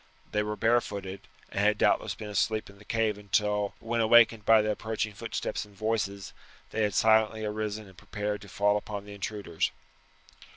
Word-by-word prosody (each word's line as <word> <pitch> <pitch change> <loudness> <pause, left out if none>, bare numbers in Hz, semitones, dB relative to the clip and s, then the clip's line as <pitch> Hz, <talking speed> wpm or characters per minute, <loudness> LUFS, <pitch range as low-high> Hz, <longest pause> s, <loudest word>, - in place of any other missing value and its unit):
They 105 - +1
were 105 0 -2
barefooted, 100 -5 0 0.2
and - - -3
had 105 +1 +3
doubtless - - +2
been 105 - -7
asleep 110 0 0
in 100 - -19
the 105 - -16
cave 110 -2 0
until, 105 0 0
when 115 0 -1
awakened 115 -1 +5
by 110 -1 +6
the 105 - +1
approaching 110 0 -3
footsteps 115 +3 -3
and 105 -1 -16
voices, 105 -2 -2 0.4
they 110 - -1
had 105 -3 +1
silently 110 0 +3
arisen 105 0 -3
and 95 - -16
prepared 105 +1 -4
to 100 - -12
fall 105 +2 +2
upon 105 -1 -6
the 105 - -9
intruders. 100 -4 -2
105 Hz, 175 wpm, -29 LUFS, 100-110 Hz, 0.4 s, by